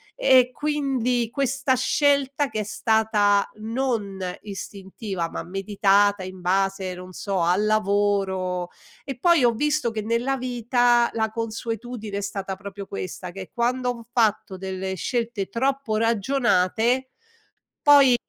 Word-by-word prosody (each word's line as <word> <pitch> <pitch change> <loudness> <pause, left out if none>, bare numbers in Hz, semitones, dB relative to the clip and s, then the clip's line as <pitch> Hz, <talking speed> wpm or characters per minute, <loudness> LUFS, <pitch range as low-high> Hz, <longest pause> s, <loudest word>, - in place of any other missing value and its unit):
E 255 - +5
quindi 260 -6 0
questa 275 0 0
scelta 280 +1 +2
che 215 - -3
è - - -2
stata 210 -2 +2
non 225 -4 -2 0.2
istintiva, 195 -2 -5
ma - - -5
meditata 195 +1 +2
in 185 0 -8
base, 190 +1 0
non 180 +1 -10
so, 195 -2 -2
al 180 +5 +2
lavoro 195 -4 0 0.3
e 270 -3 -6
poi 340 -4 +4
ho 240 - +5
visto 295 -1 0
che 215 -1 -3
nella 235 +4 0
vita 245 -1 +2
la 220 -1 0
consuetudine 225 -1 -5
è - - -2
stata 195 -1 -4
proprio 200 0 -8
questa, 185 -2 -6
che 190 0 -9
quando 250 +1 0
ho 235 -1 -5
fatto 215 -4 +1
delle 190 0 -4
scelte 230 -2 -2
troppo 265 -2 -1
ragionate, 230 +1 +1 0.7
poi 280 -4 +7
220 Hz, 130 wpm, -24 LUFS, 195-250 Hz, 0.7 s, poi